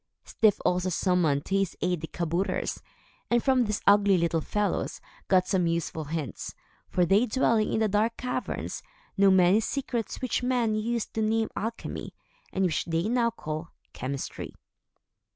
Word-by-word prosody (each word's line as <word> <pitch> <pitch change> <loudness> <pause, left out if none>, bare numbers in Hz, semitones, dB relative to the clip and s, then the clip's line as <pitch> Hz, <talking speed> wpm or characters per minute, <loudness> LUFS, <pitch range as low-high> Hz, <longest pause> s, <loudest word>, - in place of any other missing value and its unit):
Styf 215 -3 +2
also 180 +1 +2
summoned 170 -6 +1
to 195 - -1
his 195 -2 -1
aid 180 -3 0
the 160 - -4
kabouters, 170 +4 -2 0.5
and, 240 -1 +2
from 260 -2 +3
these 210 -1 -2
ugly 200 -1 +5
little 170 -1 +1
fellows, 205 +1 -1 0.3
got 185 -1 +4
some 185 -3 +2
useful 165 -1 -2
hints; 150 - -5 0.3
for 180 - +2
they, 200 +8 +4
dwelling 225 -2 +2
in 220 - +1
the 220 - +3
dark 215 +3 +1
caverns, 250 0 -3 0.3
know 195 -1 +5
many 190 +2 +5
secrets 235 -1 -3
which 255 -1 -1
men 245 -3 +1
used 225 +1 -2
to 220 - -1
name 220 +1 +1
alchemy, 225 +2 -5 0.4
and 190 0 +1
which 165 -4 0
they 165 0 0
now 235 -1 +2
call 155 -5 -6 0.2
chemistry. 135 +2 -5
195 Hz, 155 wpm, -27 LUFS, 170-225 Hz, 0.5 s, ugly